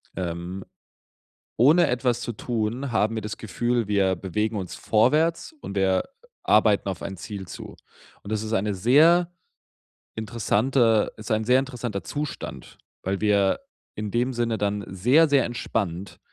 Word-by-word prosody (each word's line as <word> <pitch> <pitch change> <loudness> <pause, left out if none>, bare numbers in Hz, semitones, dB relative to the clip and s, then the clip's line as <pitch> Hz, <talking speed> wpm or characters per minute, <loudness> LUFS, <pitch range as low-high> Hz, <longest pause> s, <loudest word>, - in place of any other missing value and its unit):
Ähm, 90 +1 -5 0.9
ohne 155 +8 +5
etwas 125 -1 0
zu 120 0 -4
tun, 120 +4 -3
haben 110 0 +1
wir 110 - -2
das 105 +1 -6
Gefühl, 120 +2 -1
wir 95 -2 +2
bewegen 105 +3 -2
uns 95 -3 -5
vorwärts 155 - +1
und 100 - -7
wir 95 -1 +2 0.4
arbeiten 105 -2 +3
auf 95 -4 -5
ein 95 - -5
Ziel 95 +1 -7
zu. - - -9 0.5
Und, 100 - -8
das 110 0 -1
ist 110 - -5
eine 105 -1 0
sehr 160 - +4 0.9
interessante 110 +1 +1
ist 110 +1 -9
ein 110 0 +1
sehr 125 +3 +4
interessanter 120 -7 -5
Zustand, 145 0 -6 0.2
weil 95 +1 -2
wir 100 - +2 0.3
in 105 -1 -4
dem 120 +4 0
Sinne 120 -2 -1
dann 100 0 -1
sehr, 125 - +4
sehr 140 -3 +3
entspannt 100 -6 -3
110 Hz, 145 wpm, -25 LUFS, 100-125 Hz, 0.9 s, ohne